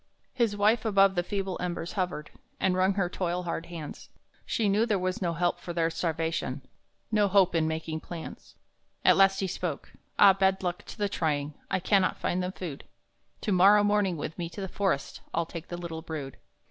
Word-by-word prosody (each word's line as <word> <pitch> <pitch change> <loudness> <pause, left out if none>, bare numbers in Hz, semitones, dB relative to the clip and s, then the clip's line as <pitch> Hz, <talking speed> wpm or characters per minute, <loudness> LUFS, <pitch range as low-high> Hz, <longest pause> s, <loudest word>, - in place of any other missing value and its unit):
His 230 -5 +1
wife 215 +3 +3
above 195 -3 +4
the 175 - +1
feeble 195 0 -3
embers 175 -1 -3
hovered, 180 -6 -3 0.3
And 190 - +2
wrung 185 +1 +2
her 195 -3 +1
toil 180 0 -2
hard 170 -1 -4
hands; 165 -4 -8 0.4
She 220 - +1
knew 210 +4 +3
there 210 -3 +2
was 185 +1 -2
no 170 -2 0
help 175 +1 0
for 175 - -6
their 165 -1 +1
starvation, 160 -5 -2 0.5
No 210 -2 +3
hope 195 -2 +4
in 160 -2 +2
making 160 0 -3
plans. 165 0 -9 0.5
At - - +7
last 195 0 +4
he - - +1
spoke: - - -4 0.3
"Ah, 195 -1 +8
bad 190 0 +1
luck 175 -1 -3
to - - -10
the 205 -1 +1
trying, 150 -5 -1 0.2
I - - +1
cannot 185 +1 +2
find 180 - -1
them 180 +1 -3
food! 165 -8 -6 0.6
To 210 - -1
morrow 200 +3 +6
morning 205 -4 +2
with 155 +1 -5
me 170 -1 -3
to 170 +4 -8
the 190 - -3
forest 190 -7 -1
I'll 170 0 +1
take 165 0 -8
the 175 - -5
little 170 -2 -6
brood! 150 -5 -6
180 Hz, 195 wpm, -28 LUFS, 165-195 Hz, 0.6 s, Ah